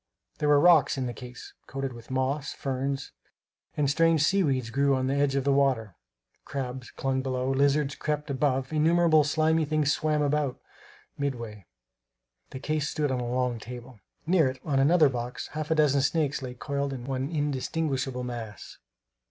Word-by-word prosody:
There 150 - +1
were 145 -1 +6
rocks 160 -5 +5
in 130 - -1
the 120 - -3
case, 125 +2 -10
coated 135 -1 -4
with 115 -1 -12
moss; 130 +2 -1
ferns 135 0 -3 0.7
and 145 -2 +2
strange 160 +1 +3
sea 195 +5 +3
weeds 130 -8 0
grew 140 +2 +2
on 130 0 -1
the 135 - 0
edge 140 -1 +1
of 135 - +1
the 140 - +2
water; 130 -8 +1 0.5
crabs 130 -2 -5
clung 135 -1 -2
below; 130 0 -1
lizards 140 +1 +2
crept 150 0 -3
above; 135 0 0
innumerable 160 0 +4
slimy 160 +2 +2
things 150 -1 +1
swam 150 -1 0
about, 145 -2 0 0.6
midway. 115 -8 -4 0.8
The - - -7
case 150 +2 -1
stood 150 -3 -1
on 130 - -1
a 120 -1 -3
long 125 -2 0
table. 120 0 -10 0.3
Near 165 -3 +4
it, 130 0 -4
on 140 -3 +1
another 155 +3 +5
box, 125 -2 -4
half 155 -1 -5
a 160 - +2
dozen 145 -3 +3
snakes 140 -1 0
lay 125 -1 -6
coiled 140 +1 -3
into 125 -1 -7
one 135 0 -2
indistinguishable 140 -3 -2
mass. 115 -4 -7
140 Hz, 170 wpm, -27 LUFS, 130-150 Hz, 0.8 s, were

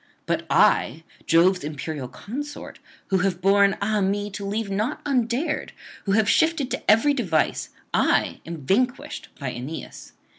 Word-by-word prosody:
But - - -1
I, 155 +7 +3 0.2
Jove's 180 +2 +4
imperial 150 -2 -5
consort, 285 - -7 0.3
who 190 - +2
have 180 -1 0
borne, 195 +1 +4
ah 210 0 +1
me! 205 +2 -1
to 200 +1 -6
leave 205 +1 -2
naught 210 +5 -1
undared, 270 +3 -1 0.3
who 195 - +1
have 215 0 +3
shifted 305 0 +2
to - - -2
every 255 +7 +5
device, 180 - 0 0.2
I - - +2
am 165 -4 -8
vanquished 255 - 0
by 135 -3 -3
Aeneas. 130 +7 -8
200 Hz, 145 wpm, -24 LUFS, 170-245 Hz, 0.3 s, every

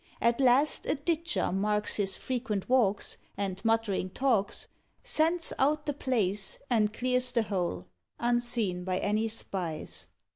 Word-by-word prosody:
At 235 +3 +2
last 265 +4 +4
a - - +2
ditcher 335 +3 -1
marks 210 +2 +1
his 195 -2 0
frequent 235 -6 -3
walks, 220 -6 +2 0.2
And 195 -1 -3
muttering 225 -5 +1
talks, 230 -3 0 0.4
Scents 330 +2 +1
out 295 +3 +2
the 290 - -1
place, 210 -8 0
and 215 -3 +3
clears 250 +2 +1
the 235 -2 +2
whole, 175 - -2 0.3
Unseen 240 -6 0
by 185 0 -1
any 210 +3 0
spies. 185 -7 -4
225 Hz, 135 wpm, -29 LUFS, 195-255 Hz, 0.4 s, last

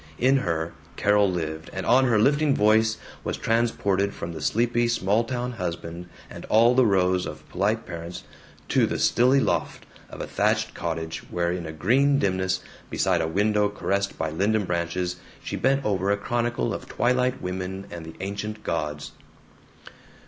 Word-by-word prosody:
In 130 +2 +4
her, 85 -7 -2 0.2
Carol 105 -1 +3
lived, 80 -3 -4
and 95 -1 -4
on 130 +3 +5
her 120 -4 +3
lifting 145 +6 +3
voice 110 +1 +3 0.3
was - - -3
transported 100 -4 +1
from 85 - -5
this 80 -2 -2
sleepy 120 +1 +1
small 110 -1 +2
town 125 +1 -3
husband 85 -4 -5 0.2
and - - -10
all 115 +3 +5
the 125 -2 +4
rows 90 -2 +2
of 75 0 -9
polite 105 +5 0
parents 85 0 -7 0.5
to - - +3
the - - -2
stilly 130 +3 +4
loft - - -1 0.2
of - - -10
a - - -3
thatched - - 0
cottage 80 0 -4
where 85 0 0
in 90 -2 -4
a - - -5
green 130 - +3
dimness, 95 -4 0 0.3
beside - - +1
a 80 - 0
window 105 +4 +2
caressed 100 -1 -2
by 80 -1 -2
linden 100 +5 +1
branches, 90 +1 -2 0.3
she - - -4
bent 135 +2 +1
over 100 -2 0
a 100 - +3
chronicle 120 +3 -1
of - - -6
twilight 125 +2 +1
women 95 +1 -4
and 85 -1 -7
the 80 - -9
ancient 105 +2 -5
gods. 75 -2 -3
100 Hz, 165 wpm, -25 LUFS, 85-115 Hz, 0.5 s, on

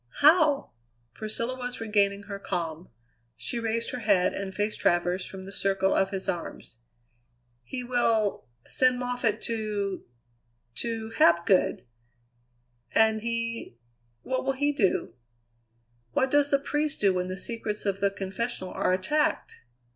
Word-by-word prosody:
"How?" 305 -2 +5 0.4
Priscilla 230 - -3
was 250 -1 -5
regaining 200 -2 +2
her 200 -1 -6
calm; 170 -2 -4 0.5
she 240 - -3
raised 230 0 -1
her 250 - -4
head 200 -5 +3
and 195 -1 -4
faced 205 +2 -2
Travers 175 +1 +2
from 190 -1 -9
the 195 +1 -9
circle 195 0 +1
of 195 - +2
his 195 -1 -5
arms. 170 -8 -5 0.8
"He 250 - -5
will 230 -4 +1 0.2
send 255 -1 +3
Moffatt 245 -3 -1
to 210 -4 -2 0.7
to 225 -1 -3
Hapgood." 170 +2 +4 1.1
"And 220 -1 +4
he 230 - -3 0.5
what 260 - -1
will 270 +1 +1
he 290 +2 +1
do?" 200 -9 +1 1.0
"What 265 0 +2
does 290 0 +4
the 280 - +4
priest 295 +2 -1
do 200 -2 +4
when 180 0 -1
the 185 0 -4
secrets 215 0 -4
of 195 -1 0
the 200 - +3
confessional 195 0 -4
are 185 - +1
attacked?" 240 +12 0
215 Hz, 135 wpm, -27 LUFS, 195-245 Hz, 1.1 s, How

